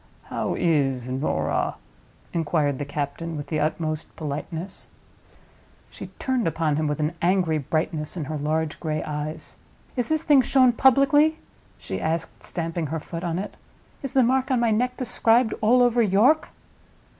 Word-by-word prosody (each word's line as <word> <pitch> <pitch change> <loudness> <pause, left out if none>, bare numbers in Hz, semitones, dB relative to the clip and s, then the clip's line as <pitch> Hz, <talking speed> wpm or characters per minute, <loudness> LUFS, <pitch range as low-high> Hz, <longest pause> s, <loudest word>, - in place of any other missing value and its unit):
"How - - -2
is 135 -7 +1
Norah?" 125 - -1 0.6
inquired 150 -4 0
the 145 - -2
captain, 145 +3 -4
with 145 - -5
the 155 - 0
utmost 155 0 -2
politeness. 160 +4 -5 1.0
She - - -8
turned 260 -6 0
upon 160 -2 0
him 155 0 0
with 150 0 -2
an 155 +2 0
angry 175 -3 +2
brightness 155 +3 -2
in 155 - -3
her 155 +2 -4
large 155 +1 -1
gray 155 -2 -2
eyes. 150 0 -5 0.4
"Is 245 -2 -1
this 315 0 0
thing 290 -4 +6
shown 255 -1 +4
publicly?" 275 +5 +4 0.4
she - - -5
asked, 160 +1 -2
stamping 165 -2 -3
her 160 +3 -3
foot 165 +2 -7
on 170 -1 -1
it. 195 - -5 0.5
"Is 275 - -5
the 265 - +5
mark 260 +2 +2
on 260 -2 +2
my 235 -1 +2
neck 250 +4 0
described 235 -2 +2
all 245 +3 +5
over 240 -1 +3
York?" 225 +9 +3
165 Hz, 155 wpm, -24 LUFS, 150-240 Hz, 1.0 s, thing